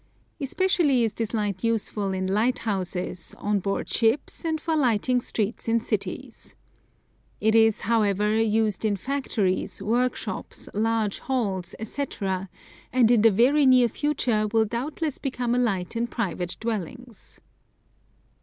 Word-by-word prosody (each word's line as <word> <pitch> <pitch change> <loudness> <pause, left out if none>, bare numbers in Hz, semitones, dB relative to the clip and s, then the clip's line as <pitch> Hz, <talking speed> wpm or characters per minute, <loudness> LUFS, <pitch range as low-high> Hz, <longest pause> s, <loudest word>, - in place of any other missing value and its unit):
Especially 290 -3 +2
is 220 -2 0
this 225 0 -2
light 205 -3 -2
useful 215 -3 0
in 190 0 -2
lighthouses, 195 -4 -1
on 205 0 0
board 195 +1 -2
ships 230 +9 0
and 320 -1 -1
for 325 +1 -1
lighting 250 -2 +2
streets 220 -1 -2
in 230 +1 +3
cities. 225 - -5 0.8
It 220 +1 +2
is, 225 -1 +4
however, 210 -1 +2
used 220 -2 +1
in 210 -2 +1
factories, 200 -7 -1
work 245 +4 +1
shops, - - -6
large 220 -1 0
halls, 195 -9 -2
etc., 200 -6 -3 0.4
and 245 -2 +4
in 235 -3 +5
the 225 - +7
very 260 +8 +4
near 255 -2 +6
future 240 -6 0
will 225 -1 +3
doubtless 280 +6 -3
become 250 -3 -2
a 245 - +2
light 195 -6 -1
in 235 +1 0
private 180 -7 -3
dwellings. 230 +1 -6
225 Hz, 135 wpm, -25 LUFS, 205-250 Hz, 0.8 s, the